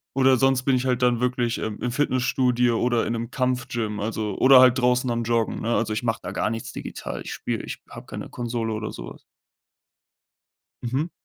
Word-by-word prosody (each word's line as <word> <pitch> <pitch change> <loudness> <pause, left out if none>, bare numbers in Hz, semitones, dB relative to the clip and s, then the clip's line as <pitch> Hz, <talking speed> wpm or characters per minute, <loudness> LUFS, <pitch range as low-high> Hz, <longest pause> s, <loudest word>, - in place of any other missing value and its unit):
Oder 130 -1 +4
sonst 135 0 +2
bin 135 -1 +3
ich 125 +1 -1
halt 125 -1 0
dann 120 -1 +3
wirklich, 125 -2 0
ähm, 110 -1 -4
im 125 - -1
Fitnessstudio 125 -3 +1
oder 120 -1 +1
in 115 - -1
'nem 115 +1 -4
Kampfgym, 125 -4 -2
also 105 -1 -3
oder 130 0 +8
halt 130 0 +6
draußen 125 0 +2
am 115 0 -1
Joggen, 115 -1 0
ne? 115 +1 0
Also, 110 -1 0
ich 110 - -3
mache 115 -1 0
da 90 - -5
gar 105 - -1
nichts 115 -1 -5
digital. - - -6
Ich - - -6
spiele - - -3
ich - - -6
habe - - -10
keine - - -7
Konsole 115 -2 -3
oder 110 0 -4
so - - -8
was. - - -19 1.6
Mhm. 135 +8 -2
120 Hz, 205 wpm, -24 LUFS, 115-130 Hz, 1.6 s, oder